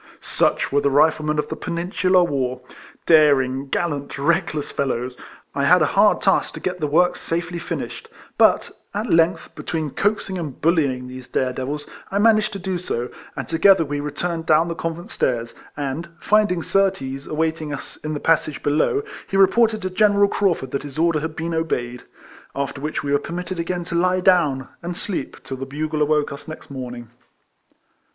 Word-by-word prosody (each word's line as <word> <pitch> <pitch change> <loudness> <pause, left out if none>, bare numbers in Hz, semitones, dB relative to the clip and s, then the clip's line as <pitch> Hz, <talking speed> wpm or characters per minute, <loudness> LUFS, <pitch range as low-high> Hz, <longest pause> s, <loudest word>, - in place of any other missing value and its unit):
Such - - 0
were 145 +1 +3
the 140 - +2
Riflemen 150 +2 +3
of 150 - -1
the - - -3
Peninsular 180 +1 +1
War, 130 -6 -1 0.2
— - - -22
daring, 140 -3 +3
gallant, 145 -2 -2
reckless 150 0 0
fellows. 125 -2 -2 0.4
I - - 0
had - - +6
a - - 0
hard - - +4
task - - +2
to - - -6
get 180 -1 -3
the 150 - 0
work 175 +5 +3
safely 170 +1 -3
finished; 170 - -5 0.3
but, - - +4 0.2
at 215 +3 -2
length, 165 +1 +2
between 155 -3 -3
coaxing 200 0 -1
and 150 -6 -6
bullying 140 -7 +1
these 130 0 -9
dare 130 -1 0
devils, 145 +4 -4 0.2
I 195 - -1
managed 215 0 +4
to - - -3
do 185 0 -2
so, 125 -8 -3 0.3
and 135 -3 -4
together 165 +1 +5
we 145 0 -3
returned 160 +3 -3
down 160 +2 +4
the - - -1
convent 165 +4 -5
stairs; 115 -2 -1 0.2
and, 145 +4 -3
finding 205 -5 +2
Surtees 140 -9 0
awaiting 160 0 -1
us 145 -1 -6
in 155 0 -4
the - - -3
passage 155 -2 +1
below, 155 - +2 0.2
he 195 - -1
re 195 - +8
ported 220 0 +2
to 185 - -2
General 205 +1 +4
Craufurd 170 -12 0
that 140 - -2
his 145 -1 -9
order 165 -1 +2
had 160 +1 -4
been 165 +1 -3
obeyed. 125 -7 -2 0.5
After 140 0 -3
which 150 0 -3
we 140 - -2
were 145 - +3
permitted 180 +1 -5
again 175 +1 -2
to 170 - -7
lie 185 +2 +2
down, 150 -8 +3
and 175 0 -5
sleep 185 -9 -5
till 130 - -6
the 135 +1 -6
bugle 155 +2 -3
awoke 150 0 +2
us 140 - -9
next 155 -2 -9
morning. 125 -3 -7
155 Hz, 185 wpm, -22 LUFS, 140-175 Hz, 0.5 s, re